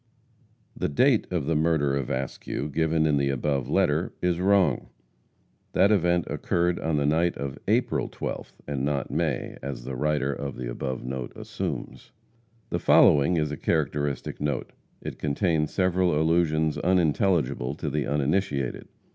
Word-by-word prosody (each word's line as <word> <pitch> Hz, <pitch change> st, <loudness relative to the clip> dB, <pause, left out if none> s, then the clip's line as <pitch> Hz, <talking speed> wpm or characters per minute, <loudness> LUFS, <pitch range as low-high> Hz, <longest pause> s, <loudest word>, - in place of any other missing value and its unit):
The -, -, -1 dB
date 120 Hz, -, +3 dB
of 85 Hz, -6 st, -1 dB
the 80 Hz, +2 st, 0 dB
murder 75 Hz, -3 st, +2 dB
of 70 Hz, -3 st, -2 dB
Askew, 70 Hz, +2 st, -3 dB
given 80 Hz, +1 st, +1 dB
in 75 Hz, -2 st, +3 dB
the 70 Hz, 0 st, +1 dB
above 70 Hz, 0 st, -1 dB
letter, -, -, +1 dB
is 90 Hz, -1 st, 0 dB
wrong. 100 Hz, 0 st, +2 dB, 0.8 s
That 100 Hz, -, +4 dB
event 90 Hz, -3 st, +2 dB
occurred 85 Hz, 0 st, 0 dB
on 80 Hz, -1 st, 0 dB
the 70 Hz, -, +1 dB
night 80 Hz, +4 st, +2 dB
of 70 Hz, -2 st, -5 dB
April -, -, +1 dB
12th, -, -, -5 dB
and 70 Hz, -2 st, -2 dB
not 70 Hz, -1 st, -1 dB
May, -, -, -2 dB
as 70 Hz, -2 st, -5 dB
the 65 Hz, +1 st, -5 dB
writer 75 Hz, 0 st, 0 dB
of 70 Hz, -1 st, -5 dB
the -, -, -5 dB
above 65 Hz, +1 st, -4 dB
note 65 Hz, -1 st, -5 dB
assumes. -, -, -5 dB, 0.6 s
The -, -, 0 dB
following 75 Hz, +5 st, +5 dB
is 75 Hz, -2 st, 0 dB
a 75 Hz, -, -4 dB
characteristic 70 Hz, -2 st, -1 dB
note. 75 Hz, -3 st, -2 dB, 0.3 s
It -, -, -7 dB
contains 75 Hz, +1 st, 0 dB
several 90 Hz, -4 st, +2 dB
allusions 80 Hz, -1 st, +2 dB
unintelligible 85 Hz, -6 st, +1 dB
to 80 Hz, -, -5 dB
the 75 Hz, -1 st, -1 dB
uninitiated. 70 Hz, -2 st, -1 dB
75 Hz, 150 wpm, -26 LUFS, 70-85 Hz, 0.8 s, following